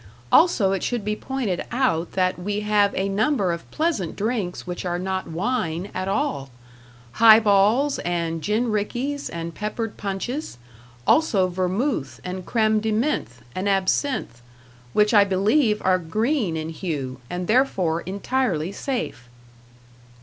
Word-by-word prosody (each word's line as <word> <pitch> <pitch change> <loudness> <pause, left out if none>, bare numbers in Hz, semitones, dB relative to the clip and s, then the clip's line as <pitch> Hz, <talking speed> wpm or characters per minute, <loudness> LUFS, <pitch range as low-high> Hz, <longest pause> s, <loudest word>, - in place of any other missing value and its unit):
Also, 225 - +5
it 195 - -1
should 240 -4 -2
be 210 0 0
pointed 240 -8 -3
out 240 -10 0
that 185 -1 +1
we 205 +3 -2
have 210 -1 +3
a 190 - 0
number 200 0 +1
of 170 0 -6
pleasant 310 - -1
drinks 210 -4 -2
which 180 -1 -5
are 175 -1 -1
not 190 +1 -3
wine 175 0 -2
at 185 0 -3
all 200 - -1 0.6
"high 220 - +8
balls" 220 +7 +3
and 170 -2 -2
"gin 220 +6 0
rickeys" 250 +7 -2
and 170 0 -5
"peppered 210 +3 -4
punches"; 205 - -4 0.5
also 210 -12 +3
#vermouthe 185 - -1
and 180 -1 -6
creme 220 -2 +2
de 220 +1 -1
menthe 210 - -1
and 190 +2 -1
absinthe#, 195 - 0 0.5
which 210 +1 +3
I 205 -2 +7
believe, 210 +4 +2
are 185 0 +4
green 215 - 0
in 155 0 -4
hue, 145 -7 -4
and 180 0 -3
therefore 185 -8 +2
entirely 195 -3 -1
safe. 235 - -4
200 Hz, 140 wpm, -23 LUFS, 180-230 Hz, 0.6 s, high